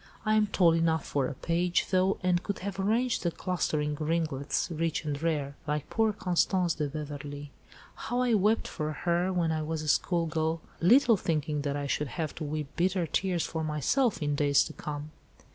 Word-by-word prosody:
I 215 - +3
am 215 -1 +4
tall 175 -4 +4
enough 165 -1 +1
for 140 -3 0
a 135 - -5
page, 170 +4 0
though, 185 +1 +3
and 180 -1 +2
could 200 0 -3
have 200 -1 -4
arranged 230 +5 +1
the 175 - +1
'clustering 155 -4 -1
ringlets, 155 -1 -1
rich 165 0 -1
and 145 -1 -3
rare,' 150 -4 -1
like 150 0 -2
poor 225 -1 +2
Constance 180 -2 +1
de 150 -2 -2
Beverley. 145 -1 -6 0.4
How 245 +1 -2
I 245 -2 +2
wept 215 +2 +2
for 155 0 -3
her, 175 +4 0
when 170 -3 +1
I 155 -1 -1
was 155 0 -3
a - - -6
school 170 +3 +2
girl, 160 +1 -1 0.2
little 235 +5 +5
thinking 155 -4 -1
that 145 -1 -2
I 145 0 -2
should 145 +1 -1
have 160 -2 -2
to 160 - -4
weep 150 -1 -4
bitter 180 0 +1
tears 180 +2 0
for 160 -1 -3
myself 155 - +1
in 145 0 0
days 145 -1 +4
to 155 - -7
come." 150 0 -6
165 Hz, 195 wpm, -29 LUFS, 150-185 Hz, 0.4 s, little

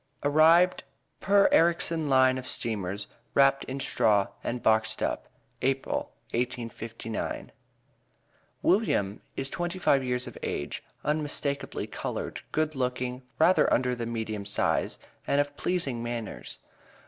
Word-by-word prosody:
ARRIVED 160 +5 +5 0.4
PER 200 0 +5
ERRICSON 165 -2 +3
LINE 130 -1 +4
OF 130 - -8
STEAMERS, 105 -6 -1 0.3
WRAPPED 135 0 +4
IN 135 +1 -5
STRAW 105 -6 +2
AND 120 0 -3
BOXED 110 0 +2
UP, - - -2 0.3
APRIL, 135 0 -1 0.2
1859. 115 -2 -4 1.1
William 140 - +2
is 135 0 -2
twenty 175 +1 -3
five 140 -7 +3
years 125 -1 -1
of - - -9
age, 70 - -3 0.2
unmistakably 150 -2 -1
colored, - - -5
good 155 0 0
looking, 125 -1 -2 0.2
rather 180 +4 +4
under 125 0 +2
the 120 -1 -4
medium 110 -3 -3
size, 100 0 +1 0.3
and 140 - +2
of 145 0 0
pleasing 140 -11 -1
manners. 120 -2 -5
130 Hz, 120 wpm, -28 LUFS, 115-150 Hz, 1.1 s, ARRIVED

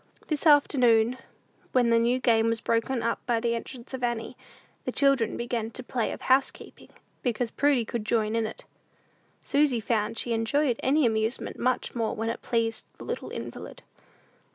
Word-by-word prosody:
This 305 +1 0
afternoon, 250 -5 +4 0.5
when 245 -2 +3
the 230 - +5
new 240 +2 +2
game 230 -3 +3
was 230 0 0
broken 230 +2 0
up 230 0 -1
by 235 -2 +2
the 235 0 0
entrance 235 +2 -7
of 260 -1 -5
Annie, 235 -2 -2 0.5
the - - -3
children 275 -6 +2
began 235 -2 -2
the 255 - -8
play 240 -1 -2
of - - -7
housekeeping, 265 +1 0 0.3
because 240 -1 -1
Prudy 280 -5 +2
could 230 0 -4
join 215 0 0
in 225 -1 +1
it. 220 - -10 0.8
Susy 280 -4 +2
found 220 0 -1
she 235 - -1
enjoyed 240 +3 +1
any 285 +2 +3
amusement 220 +1 -1
much 255 0 0
more 230 -2 -1
when 225 +1 -2
it 230 - -4
pleased 225 -1 -1
the - - -10
little - - -5
invalid. - - -8
235 Hz, 170 wpm, -27 LUFS, 225-255 Hz, 0.8 s, the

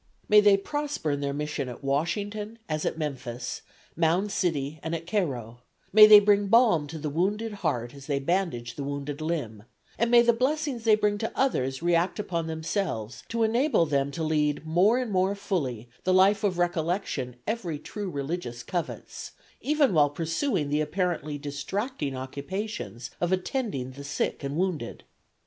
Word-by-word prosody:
"May 210 0 +7
they 205 -1 +6
prosper 290 - -3
in 145 - -1
their 140 0 -1
mission 145 -2 -3
at 125 - -9
Washington, 205 +10 -2
as 155 -1 -2
at - - -1
Memphis, 130 -5 -4 0.3
Mound 175 +5 +1
City 155 -5 -1
and 160 +1 -3
at 165 0 -6
Cairo; 125 - -2 0.3
may 215 0 +10
they 210 -1 +11
bring 205 0 +3
balm 210 -9 +4
to 160 +2 -7
the 155 0 -4
wounded 205 +7 -1
heart 120 - -2
as 140 -1 -12
they 140 -2 0
bandage 140 -6 -1
the 140 - -5
wounded 140 +1 -4
limb; 150 -10 -3 0.4
and 235 +1 +2
may 240 0 +7
the 235 0 +4
blessings 265 0 -1
they 220 -1 +6
bring 210 -1 0
to 225 - -2
others 135 - 0
react 175 +1 +2
upon 170 -6 -2
themselves 160 - -3
to 230 0 0
enable 235 - +3
them 140 -2 0
to 160 +3 -4
lead 150 -1 0
more 180 +9 +4
and 250 -4 -2
more 190 +1 +2
fully 135 - -3 0.2
the 185 0 +2
life 200 +2 +4
of 190 -4 +1
recollection 170 -7 -1
every 205 -8 -2
true 200 +6 -6
religious 140 -5 -4
covets, 175 +6 -5 0.3
even 290 -6 +2
while 145 -3 +5
pursuing 165 - -1
the 150 +1 +2
apparently 155 -2 -1
distracting 145 - -3
occupations 130 - -5
of 175 0 +1
attending 185 - -2
the 140 +2 -10
sick 145 0 -2
and 140 +2 -3
wounded! 175 -9 -2
165 Hz, 165 wpm, -27 LUFS, 140-205 Hz, 0.4 s, they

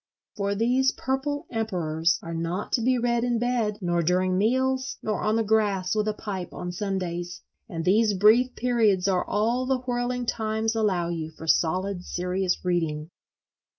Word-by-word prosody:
For 200 0 -1
these 250 +5 +2
purple 280 +2 -2
emperors 170 -7 0
are 165 - -6
not 170 +4 -3
to 235 - +1
be 255 +2 +2
read 235 0 +1
in 245 -1 +1
bed, 235 -3 0
nor 175 -1 +1
during 185 +2 +1
meals, 260 +6 +1
nor 215 - -1
on 215 - +1
the 225 - +2
grass 205 -4 +1
with 215 0 0
a 215 - +1
pipe 190 -4 -5
on 180 - -5
Sundays; 175 -2 -3 0.3
and 165 -1 -4
these 210 +2 +3
brief 225 +6 +4
periods 220 -6 +2
are 185 -2 +2
all 235 +5 0
the 260 -1 +1
whirling 245 0 -2
times 220 0 -1
allow 195 -6 0
you 160 -2 -3
for 160 0 -11
solid 180 +4 +1
serious 180 +1 -2
reading. 165 -3 -1
205 Hz, 165 wpm, -26 LUFS, 180-235 Hz, 0.3 s, brief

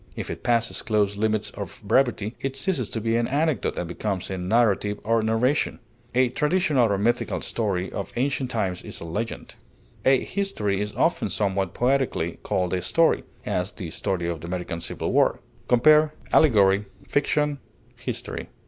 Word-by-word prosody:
If - - -4
it - - -6
passes 115 -1 +1
close 105 -2 +1
limits 110 0 0
of - - -7
brevity, 110 -1 +2
it 135 0 -2
ceases 135 - -1
to 115 - -3
be 115 +1 0
an 120 - +1
anecdote, 145 - 0
and 90 - -2
becomes 95 +2 -3
a 95 - -2
narrative 105 +1 +2
or 115 +1 +2
narration. 115 +6 +1 0.4
A 130 0 +4
traditional 150 - +2
or 100 - +2
mythical 120 +5 0
story 95 -5 -2
of 100 - -5
ancient 130 0 0
times 95 -7 -1
is - - -7
a - - -7
legend. 105 +8 -4 0.5
A 130 -1 +4
history 105 - -1
is 105 0 -3
often - - +1
somewhat 95 -3 -1
poetically 125 -10 0
called 90 -1 -1
a 90 - 0
story; 165 - +2 0.2
as, 90 +2 -1
the 90 -6 -7
story 90 -1 -1
of 85 -2 -3
the 85 - -7
American 90 -1 -4
civil - - -3
war. - - +3 0.3
Compare 150 +5 +5 0.2
ALLEGORY; 100 -8 +5 0.2
FICTION; 145 0 +1 0.4
HISTORY. - - -5
110 Hz, 165 wpm, -25 LUFS, 95-130 Hz, 0.5 s, Compare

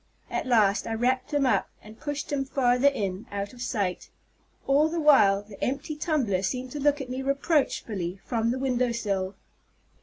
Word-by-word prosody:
At - - -2
last 215 -4 +3
I 225 - -2
wrapped 255 +4 0
him 290 -2 +2
up, 255 - +2
and 215 +1 -13
pushed 290 -1 -4
him 280 -2 0
farther 260 -1 +2
in, 200 -7 -1
out 200 +1 -4
of 245 - -12
sight. 200 -7 -2 0.6
All 285 +3 +4
the 335 +1 -2
while 205 -10 +5
the 205 -1 -10
empty 285 +4 -2
tumbler 280 - 0
seemed 250 +6 -3
to 295 - -5
look 290 0 +2
at 255 - -7
me 260 +1 -3
reproachfully 265 - 0
from 230 -1 0
the 250 - 0
window 250 -2 0
sill. 195 -4 -2
250 Hz, 180 wpm, -27 LUFS, 205-280 Hz, 0.6 s, while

